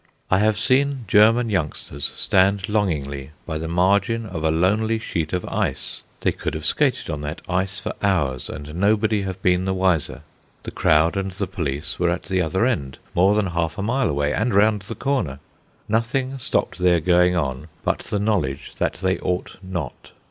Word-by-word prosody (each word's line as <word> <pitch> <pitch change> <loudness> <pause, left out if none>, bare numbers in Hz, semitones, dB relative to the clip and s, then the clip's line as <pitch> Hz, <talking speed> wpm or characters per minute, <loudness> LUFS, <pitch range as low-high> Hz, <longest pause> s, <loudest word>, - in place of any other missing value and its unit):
I 95 - +5
have 105 0 +2
seen 130 +2 +2
German 115 +2 +5
youngsters 75 -5 -2
stand 95 0 +2
longingly 75 -9 -1
by 80 -2 -3
the 80 - -4
margin 100 +7 +2
of 90 -6 -5
a 80 - +3
lonely 105 +8 +2
sheet 85 -8 -3
of 90 -1 -2
ice. - - -2 0.2
They - - +2
could - - -4
have - - -5
skated - - +1
on 75 - -4
that 75 +2 -5
ice 95 +2 -1
for - - -4
hours, 75 -11 0
and 75 +1 -7
nobody 105 +3 +2
have 95 -1 -4
been 90 0 +3
the 95 0 0
wiser. 85 -6 +1 0.4
The - - -6
crowd 80 +3 +3
and 95 0 -1
the 100 +1 -2
police 80 -5 -4
were 90 -1 +2
at 85 +1 -1
the 95 -1 0
other 95 +6 +1
end, 70 - -1 0.2
more 95 +4 +4
than 105 -1 +2
half 85 -3 -2
a 100 - -2
mile 120 +1 +1
away, 75 0 0
and 110 +4 0
round 105 0 +4
the 110 +4 -7
corner. 130 - -1 0.5
Nothing 130 +5 0
stopped 120 - -1
their 90 -1 +4
going 90 +2 +3
on 75 -3 -2 0.2
but - - 0
the 105 - -3
knowledge 95 -10 -1
that - - +1
they 95 -2 +1
ought 90 0 -3
not. 90 -8 -6
95 Hz, 185 wpm, -22 LUFS, 80-105 Hz, 0.5 s, I